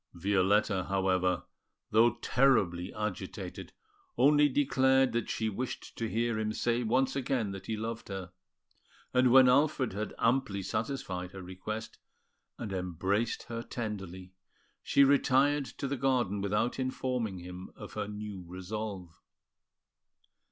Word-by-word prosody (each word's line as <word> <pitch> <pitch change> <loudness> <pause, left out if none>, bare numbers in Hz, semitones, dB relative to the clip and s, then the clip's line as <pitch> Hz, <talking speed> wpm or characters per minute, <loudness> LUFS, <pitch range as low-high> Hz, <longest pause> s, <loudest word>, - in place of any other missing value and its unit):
Violetta, 95 +1 +2
however, 95 -2 +1 0.5
though 115 +2 +5
terribly 100 -10 +2
agitated, 105 -3 -5 0.5
only 145 +1 +5
declared 130 -1 +3
that 115 -1 -2
she 110 - -1
wished 120 +4 -5
to 115 -1 -3
hear 115 0 0
him 110 -1 -1
say 120 +2 0
once 130 +4 +1
again 130 -6 -1
that 95 -1 -8
he 110 - -2
loved 115 +1 -5
her; 95 -3 -6 0.8
and 125 -1 +4
when 130 0 +8
Alfred 135 -2 +3
had 105 +2 -4
amply 115 -5 +1
satisfied 95 -4 -3
her 95 -1 -8
request, 100 +5 -6 0.6
and 110 -5 -5
embraced 95 +5 -1
her 115 -1 -5
tenderly, 95 -6 -6 0.5
she 140 - +4
retired 140 +1 +4
to 140 - -5
the 140 +1 -2
garden 120 -6 +1
without 105 +6 0
informing 125 -5 -2
him 90 +1 -8
of - - -10
her 100 - -3
new 105 -2 -6
resolve. 95 -1 -6
110 Hz, 130 wpm, -31 LUFS, 95-125 Hz, 0.8 s, when